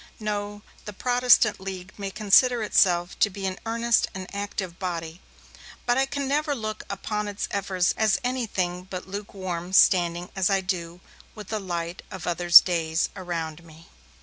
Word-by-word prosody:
No, 205 -1 -4 0.2
the 210 - -7
Protestant 245 -1 +3
League 190 -1 -7
may 200 -1 -5
consider 220 +4 +4
itself 175 -4 +2
to 205 - +4
be 195 0 -6
an 190 0 -3
earnest 230 0 +2
and 190 -1 -5
active 200 -3 -5
body, 170 -2 -5 0.6
but 240 - +2
I 270 +1 +2
can 280 0 -3
never 295 +1 0
look 215 -3 -5
upon 210 +1 -3
its 205 -1 -4
efforts 190 -2 0
as 220 -3 +2
anything 195 -8 -2
but 185 0 -6
lukewarm, 190 -3 -6
standing, 175 -2 +4
as 190 -1 +1
I 195 -1 +2
do, 180 -2 -4 0.3
with 210 -3 -10
the 215 - -2
light 175 -2 -4
of 190 -3 -8
other 175 0 -3
days 165 -2 +6
around 170 -3 -5
me. 165 0 -17
190 Hz, 160 wpm, -25 LUFS, 175-215 Hz, 0.6 s, days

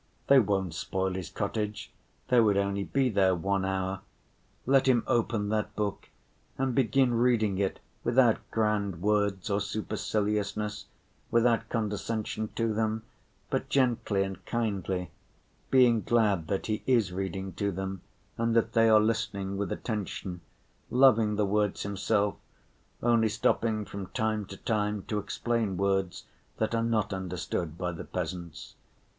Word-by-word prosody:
They 140 -1 +7
won't 95 -6 0
spoil 95 +2 -2
his 90 -4 -5
cottage, 105 +1 -3 0.4
they 125 - +5
would 105 -3 +4
only 100 0 0
be 135 +5 +1
there 95 -5 +3
one 95 +2 0
hour. 95 0 -2 0.6
Let 135 +1 +4
him 125 -3 +4
open 110 -3 0
that 105 -1 -1
book 105 -2 -3 0.5
and 130 -1 0
begin 130 0 +3
reading 115 -5 +2
it 100 -1 -1 0.2
without 120 -1 +4
grand 105 -5 0
words 105 -2 +1
or 100 +1 +1
superciliousness, 105 0 -2 0.4
without 115 0 +2
condescension 110 0 -2
to 115 -1 0
them, 110 0 -1 0.5
but - - -1
gently 120 -7 +2
and 95 0 -6
kindly, 95 -6 -2 0.6
being 125 -4 +5
glad 105 -6 +2
that 95 - -1
he 110 -1 -2
is 115 -8 +3
reading 95 0 -4
to 100 -1 -1
them 95 0 -4 0.4
and 115 0 +1
that 115 -1 +2
they 115 0 +5
are 110 -1 +7
listening 105 -3 -1
with 100 -2 -2
attention, 95 -5 -4 0.5
loving 115 -5 +5
the 105 0 +2
words 105 0 0
himself, 100 +1 0 0.7
only 115 -2 +4
stopping 110 0 +1
from 100 -2 -6
time 110 0 -1
to 95 - -9
time 105 -2 -1
to 105 - -2
explain 110 -1 -1
words 95 -1 0 0.3
that 110 +1 -1
are 115 - +1
not 110 -3 0
understood 90 -3 -3
by 90 -1 -2
the 85 - -7
peasants. 85 -3 -6
105 Hz, 140 wpm, -29 LUFS, 95-115 Hz, 0.7 s, They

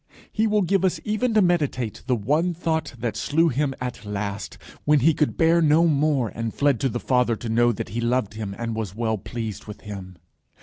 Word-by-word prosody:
He 220 +1 +1
will 210 -1 +2
give 195 +1 +1
us 185 - +1
even 220 +2 0
to 215 - +6
meditate 145 - 0
the 125 - +3
one 150 - 0
thought 160 -5 -2
that 115 -2 -3
slew 165 +9 +2
him 135 0 -1
at 125 -2 -5
last, 100 -1 -4 0.3
when 150 -2 +4
he 160 +5 +5
could 150 0 0
bear 165 +1 +4
no 160 +2 +5
more, 145 -6 +2
and 115 +1 -4
fled 140 -4 +2
to 135 - +1
the 120 - -3
Father 125 -2 +2
to 115 +1 -6
know 120 +1 +3
that 110 - -5
he 115 +4 -3
loved 120 -3 0
him, 105 -3 -5
and 115 -1 -3
was 110 -4 -4
well 110 -2 -1
pleased 110 -1 -6
with 105 - -9
him. 95 -3 -8
125 Hz, 215 wpm, -24 LUFS, 110-160 Hz, 0.3 s, to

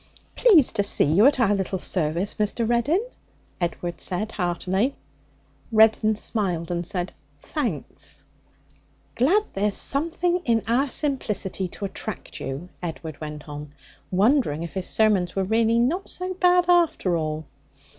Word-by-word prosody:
'Pleased 370 - +5
to - - +4
see 200 - +4
you 175 - +5
at 285 -2 +2
our 215 -4 +3
little 190 -1 -1
service, 175 +1 -1
Mr. 215 +2 0
Reddin,' 285 - +1 0.6
Edward 175 0 -3
said 210 +4 -2
heartily. 190 +6 -1 0.8
Reddin 220 0 +4
smiled 180 -6 -2
and 175 0 -1
said, 180 -1 -3 0.3
'Thanks.' 230 - -5 0.9
'Glad 350 - +3
there's 205 +4 +1
anything 345 +4 0
in 230 -5 +1
our 260 +5 +2
simplicity 215 -10 -1
to 200 - -6
attract 200 +1 -6
you,' 140 +7 -5
Edward 160 -3 -6
went 150 -1 -7
on, 145 0 -8 0.4
wondering 195 - +2
if 170 - -7
his 190 -2 -3
sermons 205 -5 +2
were 195 - +1
really 225 +3 +2
not 305 +12 0
so 365 +1 -3
bad, 360 -1 +3
after 340 - +3
all. 155 -1 -3
205 Hz, 135 wpm, -24 LUFS, 175-260 Hz, 0.9 s, Pleased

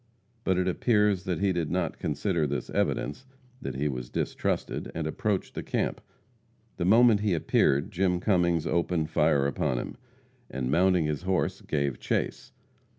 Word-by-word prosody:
But 95 -1 +1
it 90 0 +1
appears 105 -1 +2
that 90 0 -2
he 100 -2 +2
did 85 -3 -1
not 90 -1 -1
consider 80 +1 0
this 70 - -4
evidence 130 +1 -1 0.3
that - - -5
he 70 +3 0
was 60 -3 -4
distrusted, - - -2
and 80 -1 -2
approached 95 +5 -2
the - - -4
camp. - - -2 0.8
The 85 - -1
moment 115 +2 +6
he 105 -4 +1
appeared 70 -1 +2
Jim 90 -1 +1
Cummings 85 -4 +2
opened 85 -2 0
fire 70 -1 +3
upon 65 -2 0
him, - - -5 0.5
and 65 0 -3
mounting 90 +1 +3
his 75 -2 -2
horse 95 0 -1
gave 70 -3 -1
chase. - - -2
85 Hz, 155 wpm, -28 LUFS, 75-95 Hz, 0.8 s, moment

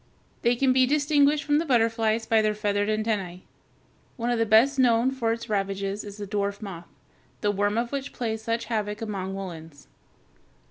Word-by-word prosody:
They 240 +1 +3
can 260 +1 +2
be 255 0 +4
distinguished 290 +1 +3
from 295 0 +2
the - - 0
butterflies 225 -3 +1
by 225 -1 +3
their 215 0 0
feathered 205 -1 0
antennæ. 210 -5 -2 0.8
One 240 0 -1
of 240 - 0
the 225 - +1
best 245 +6 +4
known 245 0 +4
for 240 -4 -1
its 230 +1 -4
ravages 195 -1 -2
is 205 -1 -9
the 205 - -5
dwarf 200 0 -2
moth, 180 -5 -8 0.5
the 205 - +2
worm 205 +1 0
of 235 0 -1
which 275 -1 -4
plays 220 -2 -3
such 230 +1 -2
havoc 210 -2 -2
among 195 -3 -4
woolens. 165 -6 -8
220 Hz, 180 wpm, -26 LUFS, 205-240 Hz, 0.8 s, be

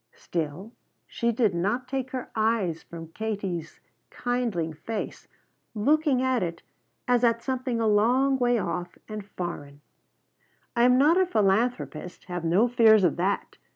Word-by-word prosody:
Still 170 +5 -4 0.3
she 235 -1 -1
did 220 -4 +1
not 205 +9 -1
take 260 0 -3
her 255 -1 -6
eyes 215 -7 0
from 165 -1 -10
Katie's 195 -5 -4 0.3
kindling 235 -10 -2
face, 210 +8 -6 0.5
looking 280 +3 +2
at 260 -2 +1
it 170 -2 -4 0.4
as 245 -1 +3
at 230 -1 +2
something 255 -2 -2
a 225 - +1
long 250 +6 +3
way 245 -1 +3
off 175 -2 -4
and 215 -1 -6
foreign. 170 -7 -7 0.9
"I 235 0 +4
am 250 0 +5
not 300 +6 +5
a 375 - +4
philanthropist, 205 - 0
have 175 -2 -5
no 180 +8 +3
fears 225 -4 +5
of 175 - +3
that. 190 +3 -1
220 Hz, 145 wpm, -26 LUFS, 175-245 Hz, 0.9 s, am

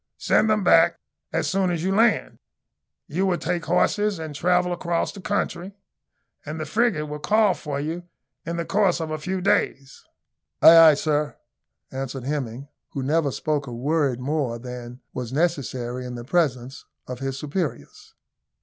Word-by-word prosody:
Send 220 - +2
them 215 -2 +2
back 170 -1 +5 0.3
as - - 0
soon 190 -1 +1
as 170 -2 -2
you 190 +1 +1
land. 225 +3 +2 0.7
You 185 +6 0
will 180 -2 +1
take 170 0 -2
horses 205 +4 +1
and 160 -2 -6
travel 180 +4 +1
across 170 -1 -1
the 200 - -11
country, 195 -2 -2 0.7
and 155 +2 -6
the 155 - -3
frigate 210 -3 +1
will 150 0 -6
call 210 +3 +3
for 145 -2 -5
you 160 +4 -3 0.4
in 170 +1 -4
the 170 - -2
course 195 -4 +2
of 160 -1 -4
a 155 - -3
few 185 +4 -3
days." 140 -7 0 0.6
"Ay, 165 - +9
ay, 165 -2 +9
sir!" 150 0 -1 0.6
answered 135 -1 -5
Hemming, 135 -2 -4 0.3
who 135 - -3
never 150 +2 +1
spoke 145 0 -2
a - - -6
work 140 +1 0
more 130 -2 -2
than 125 0 -9
was 125 -2 -5
necessary 130 -5 -1
in 125 -1 -6
the 120 -1 -7
presence 135 -5 -1 0.2
of 125 -1 -7
his 135 0 -3
superiors. 145 - -5
155 Hz, 165 wpm, -24 LUFS, 135-175 Hz, 0.7 s, Ay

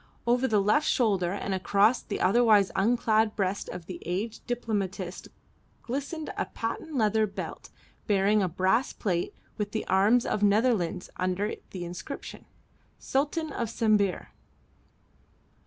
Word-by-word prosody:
Over 245 +2 +2
the 215 -4 +3
left 210 +10 +2
shoulder 195 -8 +2
and 200 0 -3
across 200 +5 +3
the - - -5
otherwise 210 0 +4
unclad 220 0 +2
breast 195 -1 -1
of 180 -2 -7
the 185 - -8
aged 200 +6 -4
diplomatist 200 -6 -3 0.6
glistened 285 +5 -4
a - - -1
patent 230 +7 -5
leather 220 -2 +2
belt 195 - -7 0.4
bearing 205 0 +3
a 185 - +1
brass 190 +9 +1
plate 175 -4 -2 0.2
with 205 -1 -2
the 220 - -2
arms 205 +6 +3
of 210 - -1
Netherlands 205 -4 +2
under 185 +3 -1 0.2
the 180 -2 -6
inscription, 180 +10 -7 0.5
"Sultan 300 +3 -1
of 235 -2 -2
Sambir." 210 -5 +1
210 Hz, 130 wpm, -28 LUFS, 190-235 Hz, 0.6 s, otherwise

